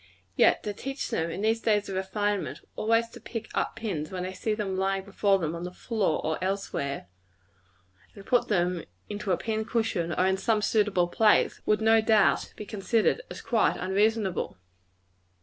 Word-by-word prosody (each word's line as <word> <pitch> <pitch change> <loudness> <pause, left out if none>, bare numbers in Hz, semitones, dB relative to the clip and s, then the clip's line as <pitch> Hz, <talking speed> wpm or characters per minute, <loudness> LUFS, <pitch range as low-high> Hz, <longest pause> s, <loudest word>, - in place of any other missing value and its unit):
Yet, - - +4
to 210 - -3
teach 270 +6 -5
them, 165 +1 0
in 180 - -4
these 225 +1 +1
days 210 -2 +2
of 195 - -5
refinement, 190 -5 -2
always 230 +1 +2
to - - -12
pick 225 -2 -6
up - - -1
pins 195 -10 -3
when 185 -1 -4
they 185 +1 -4
see 215 +3 -1
them 200 -3 -2
lying 195 0 0
before 200 0 +2
them 165 -4 -2
on 170 0 -5
the 180 - -3
floor 205 -3 -1
or 160 +3 -1
elsewhere, 185 -8 -2 1.1
and 200 - -12
put 245 - +2
them 180 -3 +1 0.3
into 205 -1 -3
a 175 - +3
pin 220 -1 -2
cushion, 220 -8 -1
or 185 - +2
in 190 0 +2
some 215 +1 +1
suitable 205 -6 +2
place, 210 +4 +3
would 215 0 +3
no 225 0 +5
doubt 220 -2 +3
be 210 - -6
considered 220 - +1
as - - -8
quite - - +2
unreasonable. 200 - 0
205 Hz, 180 wpm, -28 LUFS, 185-220 Hz, 1.1 s, no